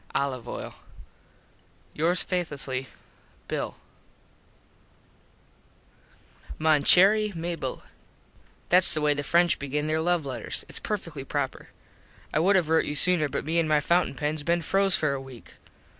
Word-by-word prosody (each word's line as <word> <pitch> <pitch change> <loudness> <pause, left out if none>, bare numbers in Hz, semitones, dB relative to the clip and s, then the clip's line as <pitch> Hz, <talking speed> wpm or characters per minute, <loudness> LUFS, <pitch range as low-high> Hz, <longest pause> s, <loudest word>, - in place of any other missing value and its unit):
Olive 130 -4 -2
oil. - - -7 1.2
Yours 170 +4 +1
faithlessly, 140 -7 -2 0.6
Bill. - - -4 2.8
Mon 155 -2 +2
Cherry 205 +7 +6
Mable: 165 -5 -5 0.9
Thats 180 -1 +4
the 155 - -1
way 150 0 +2
the 145 - -4
French 170 +4 +2
begin 145 +2 -3
there 155 +1 -1
love 175 -2 0
letters. 125 -5 -4
Its - - -8
perfectly 165 -9 -5
proper. - - -4 0.6
I - - +2
would 190 +5 +3
have 180 -4 +2
rote 160 0 +2
you 150 - -4
sooner 165 -2 +3
but - - -4
me 165 +2 0
an 165 - 0
my 155 -1 +3
fountin 170 0 +1
pens 150 +2 -2
been 170 +3 0
froze 195 +3 +3
for 155 -3 0
a 135 - -4
week. 130 -3 -13
155 Hz, 140 wpm, -26 LUFS, 145-175 Hz, 2.8 s, Cherry